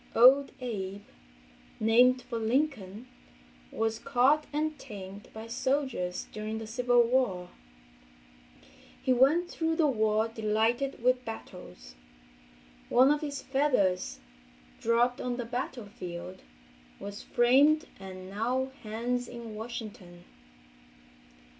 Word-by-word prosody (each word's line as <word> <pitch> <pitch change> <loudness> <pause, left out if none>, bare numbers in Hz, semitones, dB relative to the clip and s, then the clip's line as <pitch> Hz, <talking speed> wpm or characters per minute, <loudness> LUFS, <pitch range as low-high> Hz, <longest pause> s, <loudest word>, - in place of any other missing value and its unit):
"Old 265 +4 +7
Abe"—named 195 - -1
for 240 -2 -4
Lincoln—was 220 - -3
caught 275 +3 +3
and 305 +1 -1
tamed 200 -5 -9
by 220 0 -8
soldiers 240 -6 -1
during 215 +1 -4
the 220 - -6
civil 245 +1 +3
war. 230 -8 0 1.5
He 260 - +2
went 285 +8 +4
through 325 -2 -1
the 320 - +3
war 220 -4 +2
delighted 225 +4 0
with 255 0 +3
battles. 180 - -9 1.0
One 260 +3 +6
of 295 - +1
his 285 -2 -4
feathers, 255 -10 +1 0.6
dropped 240 +2 +2
on 245 -1 -2
the 245 - -3
battlefield, 205 -8 -6 0.6
was 200 0 -7
framed 275 +6 +4
and 185 -1 -9
now 245 +7 -1
hangs 240 +3 -2
in 235 -2 -8
Washington. 215 -6 -8
230 Hz, 100 wpm, -29 LUFS, 200-255 Hz, 1.5 s, Old